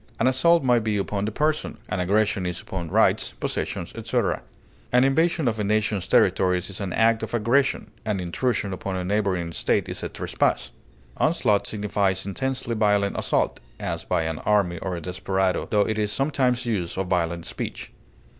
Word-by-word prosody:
An 115 - +2
assault 140 +6 +4
may 125 -2 +4
be 110 -2 -1
upon 100 0 -1
the 110 - -2
person, 150 -1 -1
an 90 - -1
aggression 100 0 +1
is 90 -1 -3
upon 85 -4 -5
rights, - - +2
possessions, - - -3
etc. - - -1 0.5
An 125 +1 +5
invasion 160 +2 +2
of 110 -2 0
a - - 0
nation's 105 -2 0
territories 90 0 +3
is 100 - -6
an 95 -2 -3
act 115 +2 +3
of - - -3
aggression; 120 +5 +1
an 105 -3 -1
intrusion 100 +2 -1
upon 95 +1 -4
a 90 - -2
neighboring 95 -3 0
estate 85 - 0
is - - -4
a - - -3
trespass. - - -1 0.5
Onslaught 100 -1 +2
signifies 100 -3 -1
intensely 130 +4 -2
violent 105 -2 +2
assault, - - 0 0.2
as - - -3
by 80 - 0
an 80 -1 -3
army 95 -5 +1
or 95 -2 -3
a 85 - -5
desperado, 95 +2 -1
tho 105 - +3
it 110 +1 0
is 105 -1 0
sometimes 130 -3 +1
used 95 -8 -2
of 95 - 0
violent 85 -2 -1
speech. - - -6
105 Hz, 175 wpm, -24 LUFS, 95-115 Hz, 0.5 s, An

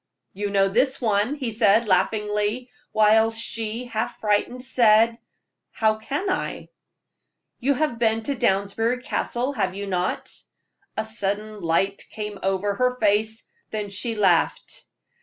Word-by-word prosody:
"You 205 +1 -3
know 195 -1 +3
this 255 +7 +1
one," 220 +3 +1
he 260 -6 -3
said, 215 0 +3
laughingly, 210 +5 0 0.2
while 220 +1 +4
she, 225 +1 -2
half 225 -1 -3
frightened, 215 +4 0
said: 230 -2 +4 0.5
"How 220 -1 +1
can 285 - -3
I?" 375 - -3 0.9
"You 275 +3 +1
have 295 -5 -1
been 225 -1 +1
to 280 - -1
Downsbury 225 +4 0
Castle, 255 -1 -2
have 190 -7 -1
you 200 +1 -4
not?" 180 -2 -2 0.6
A 220 - -1
sudden 210 -1 -3
light 185 +4 0
came 210 -2 -6
over 195 +1 0
her 250 +3 0
face, 215 +1 +1 0.2
then 210 -2 -4
she 225 +4 -1
laughed. 190 -5 +1
220 Hz, 135 wpm, -24 LUFS, 205-235 Hz, 0.9 s, while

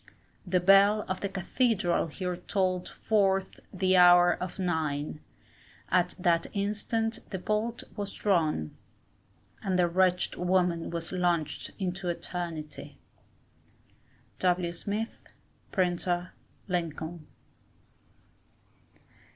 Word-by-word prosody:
The 180 0 +2
bell 195 +3 +5
of 185 - -3
the 200 - -1
cathedral 195 -1 +1
here 180 +3 -3
tolled 185 0 -1
forth 195 -3 0
the 185 0 +2
hour 175 0 +7
of 180 -1 -5
nine, 155 -5 -2 0.7
at 180 -1 +2
that 170 -2 +2
instant 215 +3 -1
the 190 - -3
bolt 215 +5 -2
was 205 -2 -4
drawn, 160 - 0 0.9
and 190 -2 0
the 180 -1 +4
wretched 180 +1 +2
woman 180 -2 +1
was 165 -1 -3
launched 175 -4 -1
into 185 -1 -3
eternity. 170 -3 -5 1.4
W. 180 -1 +1
Smith, 210 +5 -4 0.5
Printer, 175 -1 0 0.3
Lincoln. 165 -2 -3
180 Hz, 95 wpm, -29 LUFS, 175-195 Hz, 1.4 s, hour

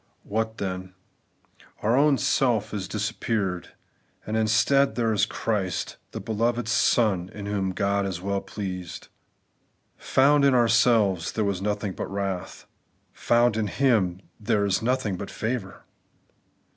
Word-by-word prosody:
What 110 +2 -2
then? 95 -1 -5 0.9
Our 115 +3 +3
own 145 0 +4
'self' 115 -8 +1
has 100 -3 -4
disappeared; 105 -4 -2 0.5
and 110 - -3
instead 110 +4 +3
there 115 -2 +1
is 105 0 +2
Christ, 100 -7 -2
the - - -6
beloved 115 +1 -1
Son 105 -5 +2
in 105 -1 -6
whom 100 -2 -1
God 100 +1 0
is 90 -3 -4
weU 100 +1 -2
pleased. 90 -3 -6 0.9
Found 140 +2 +3
in 140 -2 +5
ourselves, 115 -6 +3
there 110 - 0
was 100 -2 -1
nothing 105 -1 -2
but - - -5
wrath; 95 -2 -4 0.5
found 120 -1 +2
in 110 -2 0
Him, 100 -9 +1 0.2
there 105 -2 +1
is 95 -1 +1
nothing 115 -5 0
but 100 - -6
favour. 110 -4 -4
105 Hz, 130 wpm, -25 LUFS, 95-115 Hz, 0.9 s, in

